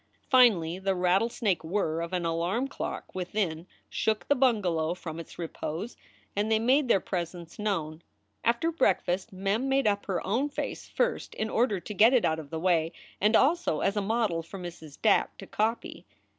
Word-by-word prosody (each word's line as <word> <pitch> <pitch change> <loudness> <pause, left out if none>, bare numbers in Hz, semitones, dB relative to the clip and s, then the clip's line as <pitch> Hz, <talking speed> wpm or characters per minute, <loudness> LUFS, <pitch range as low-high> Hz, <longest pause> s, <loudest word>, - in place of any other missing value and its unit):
Finally 190 -10 +5
the 190 0 0
rattlesnake 190 +2 +1
whirr 165 -2 -1
of 170 +1 -4
an 180 -2 -1
alarm 170 +10 0
clock 275 - -6
within 180 -2 -2 0.2
shook 220 -1 -1
the 285 - +4
bunga 240 -7 +2
low 165 0 0
from 165 -2 -7
its 165 - -10
repose 170 +4 -5 0.4
and 210 +2 0
they 220 - +5
made 260 +5 +3
their 215 - +4
presence 175 -2 -5
known. 165 -7 -2 0.4
After 240 +8 +2
breakfast, 195 - +1
Mem 200 +7 -1
made 270 0 +2
up 205 -1 +1
her 185 -3 -2
own 245 +9 0
face 285 - -5
first - - -1
in 220 0 -2
order 220 -5 +2
to 210 - -7
get 225 +6 +6
it 245 - +3
out 160 0 +1
of 150 -3 -9
the 160 - -4
way, 165 -2 +2 0.3
and 210 +3 +4
also 290 - +3
as 195 - +1
a 205 - +1
model 210 -5 0
for 165 +4 -10
Mrs. 170 -5 -9
Dack 220 - +2
to 195 - -9
copy. 220 +4 -2
195 Hz, 185 wpm, -28 LUFS, 170-230 Hz, 0.4 s, get